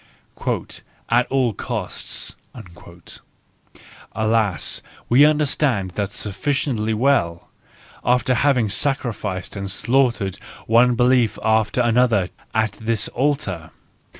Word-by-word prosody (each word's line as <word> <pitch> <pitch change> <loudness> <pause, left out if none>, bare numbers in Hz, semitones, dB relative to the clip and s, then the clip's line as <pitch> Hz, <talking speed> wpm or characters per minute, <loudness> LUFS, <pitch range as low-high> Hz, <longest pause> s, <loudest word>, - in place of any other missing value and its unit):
" - - -5
At 120 +2 +3
all 130 -4 +2
costs - - -4 0.8
": - - -24
alas, 110 -4 0 0.3
we 130 +4 +6
understand 145 -9 +1
that 100 +1 -3
sufficiently 110 +1 -1
well, 105 -9 +1 0.5
after 125 +1 +2
having 125 -2 +2
sacrificed 105 -5 -2
and 100 0 -4
slaughtered 115 -3 +1 0.3
one 120 +2 +4
belief 125 -3 +3
after 110 +1 +2
another 115 -5 +2 0.3
at 110 -1 +2
this 110 -1 0
altar! 120 - -1
115 Hz, 95 wpm, -21 LUFS, 105-130 Hz, 0.8 s, we